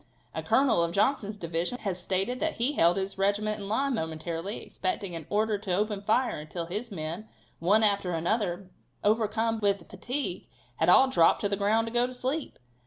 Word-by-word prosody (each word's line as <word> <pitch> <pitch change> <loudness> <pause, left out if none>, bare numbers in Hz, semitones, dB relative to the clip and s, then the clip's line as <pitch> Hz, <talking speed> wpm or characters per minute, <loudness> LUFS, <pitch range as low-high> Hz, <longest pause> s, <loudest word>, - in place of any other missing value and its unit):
A - - -3
colonel 260 -9 +3
of 170 0 0
Johnson's 210 0 +1
division 170 +5 -2
has 190 -6 -4
stated 195 +8 -1
that 320 0 0
he 240 +4 +1
held 175 - +4
his 195 0 -2
regiment 210 +2 +1
in 200 - -5
line, 270 +5 +1
momentarily 165 +1 -4
expecting 200 - -3
an 160 -2 -7
order 210 0 +1
to 195 -3 -3
open 210 0 -1
fire, 220 0 +1
until 160 +3 -5
his 210 +7 -5
men, 170 +4 -5 0.3
one 205 +6 +3
after 200 -3 +2
another, 185 +1 -1 0.3
overcome 225 +1 +1
with 200 -5 0
fatigue, 250 +9 -3 0.3
had - - +2
all 265 - +7
dropped 170 -11 +4
to 205 - 0
the 200 - +1
ground 210 +3 +2
to 230 - -6
go 240 +1 +3
to 255 - -6
sleep. 265 +5 -2
205 Hz, 185 wpm, -28 LUFS, 180-225 Hz, 0.3 s, all